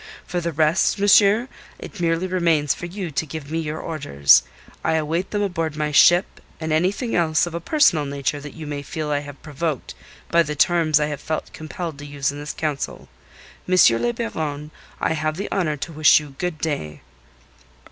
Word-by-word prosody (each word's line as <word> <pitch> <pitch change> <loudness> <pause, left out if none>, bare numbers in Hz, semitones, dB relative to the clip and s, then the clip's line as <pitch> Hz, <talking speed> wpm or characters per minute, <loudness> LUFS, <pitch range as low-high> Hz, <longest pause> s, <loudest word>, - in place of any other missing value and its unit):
For 175 -1 -3
the 170 0 -2
rest, 155 +5 +2
monsieur, 205 +3 +5 0.3
it 205 - -10
merely 165 +1 0
remains 170 -5 +1
for 175 - -7
you 180 -1 -5
to 135 +2 -1
give 150 0 -7
me 165 - -1
your 155 -1 -4
orders. 70 - +3 0.4
I 160 - +1
await 160 +4 -1
them 205 -1 -1
aboard 165 -5 -2
my 150 0 -2
ship 175 +5 +4 0.2
and 160 -1 -2
anything 195 +9 0
else, 160 -2 +2
of 175 - -7
a 170 - -3
personal 170 - +3
nature, 140 +1 -2
that 145 0 -10
you 160 -2 -8
may 145 -1 -4
feel 150 +1 -4
I 145 - +1
have 145 -1 -10
provoked 155 -2 -4 0.4
by 170 - +5
the 150 -2 -2
terms 160 -1 +3
I 150 - +1
have 150 -1 -5
felt 155 - -4
compelled 160 -1 -6
to 145 - -8
use 140 -1 -2
in 145 - -8
this 145 +1 -5
council. 150 -3 -4 0.6
M. 185 - +3 0.3
le 240 - +1
Baron, 155 -11 -4 0.3
I - - 0
have 155 0 -2
the 200 - -5
honour 165 -6 0
to 165 - -6
wish 155 0 +6
you 150 -2 -11
good 180 -3 -2
day." 140 - -4
155 Hz, 195 wpm, -22 LUFS, 150-175 Hz, 0.6 s, wish